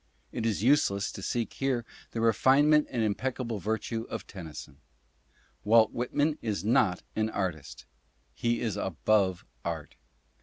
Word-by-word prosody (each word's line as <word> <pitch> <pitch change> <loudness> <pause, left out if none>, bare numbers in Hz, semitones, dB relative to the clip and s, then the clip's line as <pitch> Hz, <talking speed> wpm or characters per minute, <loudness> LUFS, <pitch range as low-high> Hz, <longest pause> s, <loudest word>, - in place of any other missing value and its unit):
It 115 - -2
is 105 -2 -1
useless 105 -7 +3
to - - -8
seek 115 +4 -2
here 130 -4 -1 0.2
the 115 - -4
refinement 140 +7 +4
and 120 -4 -1
impeccable 115 +1 -2
virtue 110 +2 -2
of - - -5
Tennyson. 80 -6 -9 0.9
Walt 110 +1 +5
Whitman 145 +5 0
is 105 -4 -2
not 110 -6 +3
an 110 0 +1
artist; 90 -9 -4 0.5
he 120 0 0
is 110 -4 -1
above 95 0 +1 0.2
art. 80 -5 -5
110 Hz, 130 wpm, -29 LUFS, 100-120 Hz, 0.9 s, Walt